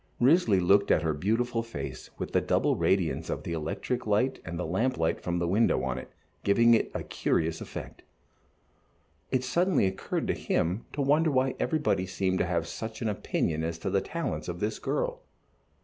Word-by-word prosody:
Risley 125 Hz, -, +4 dB
looked 100 Hz, +3 st, +4 dB
at 80 Hz, -, +4 dB
her 80 Hz, -1 st, +1 dB
beautiful 115 Hz, +9 st, 0 dB
face 115 Hz, 0 st, -7 dB
with -, -, -4 dB
the -, -, +3 dB
double -, -, +2 dB
radiance 95 Hz, -4 st, +1 dB
of -, -, -3 dB
the 85 Hz, -, -4 dB
electric 110 Hz, +10 st, -3 dB
light 110 Hz, +6 st, +2 dB
and 85 Hz, +1 st, -5 dB
the 90 Hz, -, -2 dB
lamp 115 Hz, +10 st, 0 dB
light 80 Hz, -, 0 dB
from 90 Hz, 0 st, -1 dB
the 85 Hz, 0 st, 0 dB
window 95 Hz, -, +2 dB
on 65 Hz, -1 st, -2 dB
it, -, -, -10 dB, 0.3 s
giving 115 Hz, +4 st, +5 dB
it 115 Hz, -, +2 dB
a -, -, -2 dB
curious 80 Hz, 0 st, -1 dB
effect. -, -, -8 dB, 1.3 s
It 130 Hz, -1 st, +1 dB
suddenly 170 Hz, -, +2 dB
occurred 95 Hz, 0 st, -2 dB
to -, -, +1 dB
him 90 Hz, +7 st, -1 dB
to 145 Hz, -, -1 dB
wonder 150 Hz, +4 st, +3 dB
why 130 Hz, -2 st, +2 dB
everybody 115 Hz, -, +1 dB
seemed 95 Hz, 0 st, 0 dB
to -, -, +1 dB
have 85 Hz, -2 st, 0 dB
such 110 Hz, +5 st, -6 dB
an 110 Hz, -, +1 dB
opinion 80 Hz, -5 st, -1 dB
as 80 Hz, 0 st, -2 dB
to 95 Hz, +3 st, -3 dB
the 100 Hz, -, +2 dB
talents 170 Hz, +1 st, -3 dB
of -, -, -4 dB
this -, -, -2 dB
girl. -, -, -2 dB
100 Hz, 190 wpm, -28 LUFS, 85-125 Hz, 1.3 s, giving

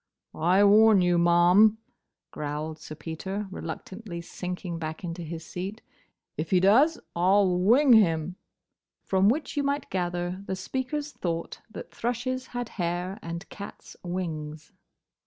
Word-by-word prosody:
"I 180 Hz, +5 st, +3 dB
warn 210 Hz, 0 st, +6 dB
you, 175 Hz, -1 st, +3 dB
ma'am," 175 Hz, +5 st, +5 dB, 0.5 s
growled 150 Hz, +1 st, -4 dB
Sir 155 Hz, -, -9 dB
Peter, 190 Hz, +6 st, -5 dB
reluctantly 190 Hz, -1 st, -7 dB
sinking 180 Hz, 0 st, -5 dB
back 160 Hz, +2 st, -5 dB
into 175 Hz, 0 st, -5 dB
his 165 Hz, 0 st, -7 dB
seat, 195 Hz, +5 st, -6 dB, 0.5 s
"if 155 Hz, +1 st, -3 dB
he 185 Hz, -, +4 dB
does, 245 Hz, -, +5 dB, 0.2 s
I 180 Hz, +3 st, +3 dB
'll 185 Hz, -3 st, +3 dB
wing 245 Hz, +8 st, +5 dB
him." 175 Hz, -5 st, +3 dB, 0.7 s
From 190 Hz, +1 st, +3 dB
which 300 Hz, +7 st, -1 dB
you 290 Hz, -, +1 dB
might 280 Hz, 0 st, -2 dB
gather 175 Hz, 0 st, -2 dB
the 190 Hz, -, -2 dB
speakers 265 Hz, +9 st, -3 dB
thought 170 Hz, -7 st, -4 dB
that 220 Hz, -, -9 dB
thrushes 255 Hz, +2 st, -2 dB
had 245 Hz, -1 st, -5 dB
hair 175 Hz, +4 st, -2 dB
and 170 Hz, +2 st, -6 dB
cats 200 Hz, 0 st, -10 dB
wings. 155 Hz, -4 st, -5 dB
185 Hz, 140 wpm, -27 LUFS, 170-220 Hz, 0.7 s, warn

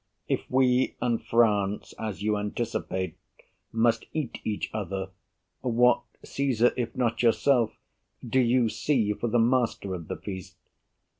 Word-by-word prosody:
If -, -, -2 dB
we 130 Hz, 0 st, +3 dB
and 120 Hz, -2 st, 0 dB
France, 105 Hz, -3 st, +2 dB
as 105 Hz, -4 st, -4 dB
you 105 Hz, 0 st, +2 dB
anticipate, 105 Hz, -3 st, -3 dB, 0.5 s
Must 115 Hz, 0 st, +2 dB
eat 150 Hz, -7 st, -3 dB
each 105 Hz, -1 st, -3 dB
other, 95 Hz, -2 st, -3 dB, 0.5 s
what 125 Hz, 0 st, +3 dB, 0.2 s
Caesar, 125 Hz, -4 st, +1 dB
if 120 Hz, -2 st, -3 dB
not 120 Hz, -3 st, 0 dB
yourself, 120 Hz, 0 st, +3 dB, 0.5 s
Do 130 Hz, +3 st, +2 dB
you 120 Hz, -1 st, +3 dB
see 110 Hz, -3 st, +1 dB
for 120 Hz, -, -3 dB
the 120 Hz, +1 st, +2 dB
master 115 Hz, -4 st, +1 dB
of 85 Hz, -3 st, -6 dB
the -, -, -3 dB
feast? 95 Hz, -3 st, -8 dB
115 Hz, 135 wpm, -27 LUFS, 105-125 Hz, 0.5 s, we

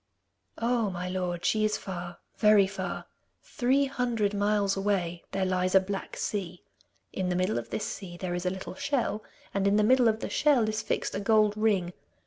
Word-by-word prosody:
'Oh, 235 Hz, -2 st, +1 dB
my 180 Hz, -1 st, -4 dB
lord, 180 Hz, -2 st, -3 dB
she 215 Hz, -1 st, +2 dB
is 215 Hz, 0 st, +1 dB
far, 175 Hz, -2 st, -6 dB, 0.2 s
very 210 Hz, -2 st, +5 dB
far. 190 Hz, -2 st, -5 dB, 0.4 s
Three 265 Hz, +3 st, +1 dB
hundred 240 Hz, -6 st, -1 dB
miles 205 Hz, -1 st, +1 dB
away 190 Hz, -4 st, -1 dB
there 190 Hz, 0 st, 0 dB
lies 185 Hz, 0 st, 0 dB
a -, -, +9 dB
black 195 Hz, +1 st, -5 dB
sea. 185 Hz, -4 st, -4 dB, 0.5 s
In 185 Hz, -1 st, -1 dB
the 180 Hz, -, 0 dB
middle 185 Hz, -, +1 dB
of 115 Hz, 0 st, -9 dB
this -, -, -3 dB
sea 175 Hz, -3 st, -6 dB
there 180 Hz, 0 st, -3 dB
is 175 Hz, +1 st, -2 dB
a -, -, +4 dB
little 190 Hz, 0 st, -6 dB
shell, 230 Hz, -1 st, -1 dB, 0.3 s
and 195 Hz, 0 st, +1 dB
in 200 Hz, -, +3 dB
the 210 Hz, -, +4 dB
middle 250 Hz, +2 st, +5 dB
of 220 Hz, -1 st, +2 dB
the -, -, -4 dB
shell 275 Hz, -7 st, +3 dB
is 215 Hz, 0 st, -1 dB
fixed -, -, -2 dB
a -, -, -2 dB
gold 215 Hz, 0 st, +3 dB
ring. 200 Hz, -5 st, +1 dB
200 Hz, 195 wpm, -28 LUFS, 185-215 Hz, 0.5 s, a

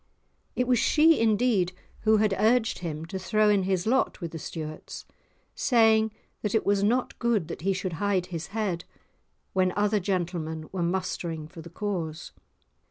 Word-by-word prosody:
It 250 Hz, -, 0 dB
was 250 Hz, -3 st, +3 dB
she 320 Hz, +1 st, +5 dB
indeed 215 Hz, -4 st, +2 dB, 0.3 s
who 220 Hz, 0 st, +4 dB
had 210 Hz, -1 st, +2 dB
urged 225 Hz, +1 st, +2 dB
him 160 Hz, -2 st, -5 dB
to 190 Hz, +3 st, -5 dB
throw 210 Hz, +3 st, +2 dB
in 200 Hz, -3 st, +3 dB
his 190 Hz, -2 st, 0 dB
lot 260 Hz, +4 st, +1 dB
with 170 Hz, -4 st, -5 dB
the 165 Hz, -, -6 dB
Stuarts, 155 Hz, +1 st, -7 dB, 0.5 s
saying 220 Hz, -3 st, +3 dB, 0.3 s
that 210 Hz, 0 st, -1 dB
it 220 Hz, -, +1 dB
was 200 Hz, 0 st, +2 dB
not 245 Hz, +5 st, 0 dB
good 230 Hz, -8 st, +1 dB
that -, -, -6 dB
he 195 Hz, +3 st, +1 dB
should 185 Hz, -2 st, -2 dB
hide 200 Hz, -3 st, +1 dB
his 170 Hz, -2 st, -6 dB
head 195 Hz, -5 st, -2 dB, 0.7 s
when 185 Hz, -1 st, +2 dB
other 210 Hz, +1 st, +2 dB
gentlemen 170 Hz, -4 st, -2 dB
were 190 Hz, -, -3 dB
mustering 170 Hz, -3 st, -2 dB
for 165 Hz, +1 st, -11 dB
the 170 Hz, -, -11 dB
cause. 170 Hz, -5 st, -4 dB
195 Hz, 165 wpm, -27 LUFS, 170-220 Hz, 0.7 s, she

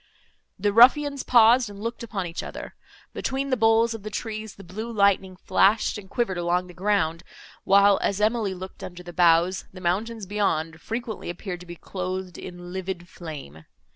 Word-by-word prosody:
The 205 Hz, +1 st, 0 dB
ruffians 280 Hz, +4 st, +6 dB
paused, 240 Hz, 0 st, +5 dB
and 200 Hz, -1 st, -10 dB
looked 230 Hz, +3 st, -4 dB
upon 210 Hz, -5 st, -4 dB
each 170 Hz, 0 st, -5 dB
other. -, -, -8 dB, 0.4 s
Between 270 Hz, +1 st, -2 dB
the -, -, +4 dB
boles 225 Hz, 0 st, +3 dB
of 225 Hz, -, -7 dB
the 215 Hz, -, -6 dB
trees, 215 Hz, 0 st, -5 dB
the 195 Hz, -, -12 dB
blue 215 Hz, +6 st, -6 dB
lightning 200 Hz, -3 st, +2 dB
flashed 195 Hz, +4 st, +2 dB
and 190 Hz, -2 st, -13 dB
quivered 200 Hz, -7 st, -1 dB
along 175 Hz, +1 st, +1 dB
the 180 Hz, -, -12 dB
ground, 180 Hz, -4 st, 0 dB, 0.4 s
while, 200 Hz, 0 st, +5 dB
as 200 Hz, -, 0 dB
Emily 215 Hz, -2 st, +1 dB
looked 185 Hz, +1 st, -9 dB
under 180 Hz, 0 st, -8 dB
the 175 Hz, 0 st, -9 dB
boughs, 175 Hz, +1 st, +3 dB
the 185 Hz, -, -11 dB
mountains 205 Hz, +5 st, -1 dB
beyond, 165 Hz, -6 st, -1 dB
frequently 230 Hz, -3 st, -5 dB
appeared 175 Hz, +1 st, -5 dB
to 180 Hz, -, -13 dB
be 175 Hz, -, -8 dB
clothed 185 Hz, 0 st, -5 dB
in 175 Hz, 0 st, -9 dB
livid 185 Hz, -2 st, -5 dB
flame. 140 Hz, -, -9 dB
195 Hz, 175 wpm, -25 LUFS, 180-225 Hz, 0.4 s, ruffians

